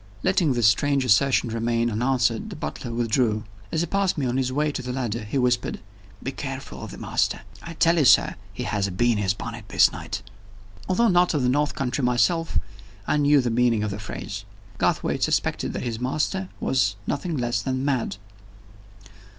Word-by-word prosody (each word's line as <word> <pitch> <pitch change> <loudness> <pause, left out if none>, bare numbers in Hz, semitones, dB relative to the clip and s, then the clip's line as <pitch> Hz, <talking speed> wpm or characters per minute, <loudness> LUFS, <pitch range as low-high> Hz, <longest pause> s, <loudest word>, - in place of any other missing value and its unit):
Letting 180 -6 +2
this 120 -2 +1
strange 135 +6 +3
assertion 125 +2 +3
remain 115 +1 0
unanswered, 120 - +1
the 200 - -7
butler 125 -5 -5
withdrew. 115 -2 +1 0.3
As 160 - 0
he - - +1
passed 195 +1 0
me 140 - 0
on 125 +1 0
his 130 -1 0
way 150 +3 +1
to 135 - -4
the 125 0 -4
ladder, 120 -4 -2
he 105 +6 -3
whispered: 125 -2 +1 0.4
"Be - - -2
careful - - -6
of - - -6
the - - -9
master! - - 0 0.2
I 170 -1 -8
tell 165 +1 +3
you, 145 - +3
sir, - - +6 0.2
he - - -5
has 100 -2 0
a - - -5
bee 120 +7 +2
in 110 - 0
his 95 -1 +1
bonnet 115 0 -7
this - - +5
night." - - -6 0.7
Although 230 +5 +3
not 175 -2 +3
of 140 - +1
the 125 - +3
north 145 +3 +1
country 130 0 -2
myself, 125 +8 +2 0.5
I - - +1
knew 145 -1 +4
the 120 -2 -1
meaning 115 -2 +2
of 105 - -2
the 100 - -5
phrase. 100 -1 -6 0.4
Garthwaite - - 0
suspected - - 0
that - - -4
the 115 -2 -3
master 155 +9 -1
was 130 -7 +1
nothing 160 +2 -2
less 120 -4 0
than 130 +3 -2
mad! 130 -8 0
125 Hz, 195 wpm, -24 LUFS, 115-145 Hz, 0.7 s, sir